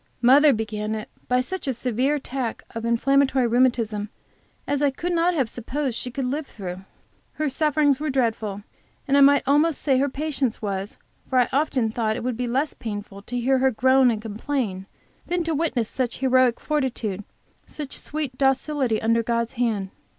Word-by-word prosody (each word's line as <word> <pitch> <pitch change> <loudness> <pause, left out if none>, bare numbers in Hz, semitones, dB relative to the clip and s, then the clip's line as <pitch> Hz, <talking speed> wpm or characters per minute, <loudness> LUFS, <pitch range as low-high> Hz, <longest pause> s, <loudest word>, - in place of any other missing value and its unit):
Mother 280 +5 +7
began 215 -2 -2
it 215 - -6 0.2
by 250 0 +2
such 370 +5 -5
a 265 - 0
severe 255 +4 0
attack 260 -4 -4
of 230 0 -4
inflammatory 265 +2 +3
rheumatism 230 -4 +1 0.6
as 285 0 -1
I 290 - +4
could 345 +6 -3
not 340 +1 +2
have 270 -6 +1
supposed 255 +3 -3
she 250 - -3
could 260 +1 -3
live 280 +3 -2
through. 185 -3 -7 0.5
Her 305 -1 -1
sufferings 295 -1 +2
were 305 0 -2
dreadful, 220 -6 -1 0.4
and 275 - +2
I 280 - +6
might 280 +1 +6
almost 295 +3 +3
say 265 -3 +2
her 280 +1 +1
patience 275 -4 -2
was, 200 -1 -4 0.3
for 260 - +1
I 250 - +4
often 265 -5 +1
thought 220 -1 -1
it - - -5
would 250 -1 -1
be 245 +1 -2
less 270 +5 0
painful 205 -2 -7
to 245 +4 -4
hear 260 +2 +2
her 265 +1 +4
groan 260 +2 +4
and 225 -3 0
complain, 215 -3 -3 0.4
than 350 0 0
to 325 0 -1
witness 285 -7 0
such 250 -1 -2
heroic 255 -2 +3
fortitude, 245 -9 -2 0.4
such 295 -3 -6
sweet 295 -4 -4
docility 270 -3 +1
under 230 +1 +2
God's 235 0 -1
hand. 220 -6 -1
255 Hz, 180 wpm, -24 LUFS, 225-280 Hz, 0.6 s, Mother